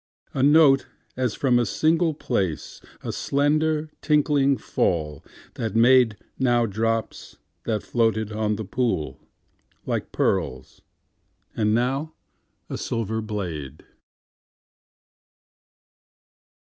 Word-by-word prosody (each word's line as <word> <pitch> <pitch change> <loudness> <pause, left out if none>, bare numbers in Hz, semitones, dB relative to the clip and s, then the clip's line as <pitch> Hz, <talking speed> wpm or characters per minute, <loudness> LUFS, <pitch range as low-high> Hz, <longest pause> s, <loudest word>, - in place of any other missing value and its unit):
A 135 - -1
note 145 -1 +5 0.3
as 125 -4 -1
from 125 -3 +2
a - - +3
single 160 - +1
place,A 95 - -4
slender 155 +2 0
tinkling 145 -2 +2
fall 75 -9 -1 0.3
that 110 -2 -4
madeNow 120 0 +3
drops 115 +2 -3 0.3
that 110 -2 -1
floated 110 -2 0
on 105 0 -1
the 110 +1 -5
poolLike 100 -7 -5
pearls, - - -2 0.7
and 105 -1 +2
now 135 +6 -1 0.5
a - - -5
silver 110 -1 -2
blade. 85 - -5
120 Hz, 85 wpm, -24 LUFS, 105-140 Hz, 0.7 s, note